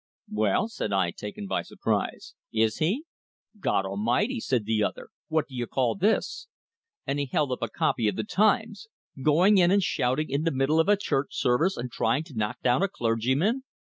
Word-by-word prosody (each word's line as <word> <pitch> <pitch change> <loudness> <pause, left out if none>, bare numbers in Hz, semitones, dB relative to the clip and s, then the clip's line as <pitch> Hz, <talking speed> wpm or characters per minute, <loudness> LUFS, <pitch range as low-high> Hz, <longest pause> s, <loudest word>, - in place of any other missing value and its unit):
"Well," 105 - +1
said 225 - -4
I, 95 -3 +1
taken 105 +1 -7
by - - -1
surprise, - - -3 0.2
"is 110 -1 +1
he?" 205 - 0 0.5
"God 100 - +1
Almighty!" 115 - 0
said 125 - -1
the 110 0 +1
other. - - -3 0.2
"What 155 -2 0
do 135 - -16
you 120 -2 -3
call 125 -3 +1
this?" 205 +4 0 0.6
And 140 - -1
he 140 - -1
held 140 +1 0
up 125 - -3
a 115 - -1
copy 110 0 0
of 105 - 0
the 110 - -2
"Times." 215 - +1 0.3
"Going 175 +8 +5
in 175 -1 +5
and 200 +1 +3
shouting 130 +2 0
in 140 +2 0
the 165 - +1
middle 135 +3 +1
of 160 - +3
a 205 - +5
church 145 -8 -2
service, 160 +11 +2
and 125 0 -5
trying 120 +7 0
to 160 -3 -14
knock 105 -1 -2
down 125 +5 +3
a 195 - +3
clergyman!" 130 - 0
135 Hz, 195 wpm, -27 LUFS, 115-185 Hz, 0.6 s, Going